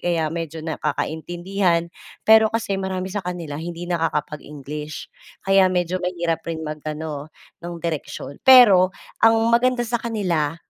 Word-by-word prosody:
kaya 165 Hz, -3 st, 0 dB
medyo 165 Hz, -1 st, -5 dB
nagkakaintindihan. 170 Hz, +3 st, -1 dB, 0.4 s
Pero 220 Hz, 0 st, +7 dB
kasi 210 Hz, -4 st, -1 dB
marami 190 Hz, 0 st, -3 dB
sa 205 Hz, -, -2 dB
kanila 165 Hz, -5 st, -5 dB
hindi 170 Hz, +1 st, -6 dB
nakakapag-English 150 Hz, -3 st, -4 dB, 0.4 s
kaya 195 Hz, -1 st, +5 dB
medyo 180 Hz, 0 st, -1 dB
mahirap 170 Hz, -2 st, -2 dB
rin 160 Hz, -1 st, -3 dB
mag-ano 150 Hz, -1 st, -5 dB, 0.3 s
nung 170 Hz, 0 st, -6 dB
direksyon. 155 Hz, -3 st, -5 dB
Pero 200 Hz, -8 st, +7 dB, 0.3 s
ang 225 Hz, 0 st, +6 dB, 0.2 s
maganda 245 Hz, 0 st, +3 dB
sa 235 Hz, 0 st, -2 dB
kanila, 175 Hz, -9 st, -1 dB
175 Hz, 125 wpm, -22 LUFS, 155-195 Hz, 0.4 s, Pero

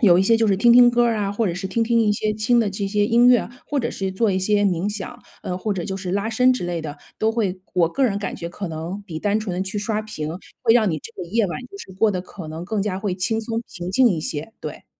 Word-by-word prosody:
有 180 Hz, -4 st, +6 dB
一 -, -, +4 dB
些 225 Hz, +3 st, +4 dB
就 225 Hz, -1 st, +2 dB
是 200 Hz, -, +3 dB
听 235 Hz, +3 st, +5 dB
听 245 Hz, -1 st, +8 dB
歌 240 Hz, 0 st, +3 dB
儿 230 Hz, -1 st, +1 dB
啊， 200 Hz, -1 st, -1 dB
或 215 Hz, +1 st, 0 dB
者 170 Hz, -, -1 dB
是 190 Hz, +2 st, -4 dB
听 230 Hz, +5 st, 0 dB
听 230 Hz, +1 st, +2 dB
一 210 Hz, -1 st, +3 dB
些 215 Hz, +1 st, -1 dB
轻 235 Hz, +3 st, +3 dB
的 215 Hz, -, +1 dB
这 195 Hz, 0 st, -3 dB
些 205 Hz, +1 st, +1 dB
音 235 Hz, +1 st, +4 dB
乐， 245 Hz, -1 st, +4 dB, 0.2 s
或 285 Hz, -2 st, 0 dB
者 235 Hz, -, -2 dB
是 190 Hz, -1 st, -3 dB
做 215 Hz, +2 st, +1 dB
一 185 Hz, -, +1 dB
些 205 Hz, +2 st, +2 dB
冥 185 Hz, -1 st, +1 dB
想， 220 Hz, +4 st, -6 dB, 0.2 s
呃， 180 Hz, -3 st, -3 dB
或 210 Hz, +2 st, -2 dB
者 180 Hz, -3 st, -3 dB
就 190 Hz, -1 st, -3 dB
是 185 Hz, -1 st, -4 dB
拉 200 Hz, +2 st, 0 dB
伸 250 Hz, +3 st, +4 dB
之 250 Hz, -, -3 dB
类 170 Hz, -2 st, -3 dB
的， 150 Hz, -2 st, -7 dB, 0.2 s
都 220 Hz, +1 st, +1 dB
会 200 Hz, -5 st, -1 dB
我 170 Hz, -2 st, +3 dB
个 270 Hz, +10 st, 0 dB
人 200 Hz, -4 st, +1 dB
感 200 Hz, -, -4 dB
觉 170 Hz, -, -6 dB
可 175 Hz, +2 st, -5 dB
能 165 Hz, +6 st, -5 dB
比 160 Hz, -4 st, -5 dB
单 210 Hz, +4 st, 0 dB
纯 195 Hz, -5 st, -4 dB
地 185 Hz, -, 0 dB
去 200 Hz, +2 st, -4 dB
刷 215 Hz, +1 st, -1 dB
屏， 155 Hz, -8 st, -5 dB, 0.3 s
会 230 Hz, -1 st, +4 dB
让 215 Hz, -6 st, +4 dB
你 155 Hz, -, -2 dB
这 230 Hz, -, -11 dB
个 -, -, -7 dB
夜 220 Hz, +1 st, +2 dB
晚 175 Hz, -, -4 dB
就 400 Hz, -, -10 dB
是 190 Hz, -, -10 dB
过 220 Hz, -2 st, +4 dB
得 185 Hz, -, -2 dB
可 180 Hz, -2 st, -10 dB
能 160 Hz, +2 st, -6 dB
更 215 Hz, -3 st, -1 dB
加 190 Hz, -2 st, -2 dB
会 195 Hz, -3 st, -2 dB
轻 220 Hz, +5 st, 0 dB
松、 225 Hz, 0 st, -3 dB, 0.2 s
平 180 Hz, 0 st, -5 dB
静 250 Hz, +5 st, +5 dB
一 165 Hz, -, -1 dB
些， 155 Hz, +6 st, -5 dB
对。 -, -, -7 dB
205 Hz, 320 characters per minute, -22 LUFS, 185-225 Hz, 0.3 s, 听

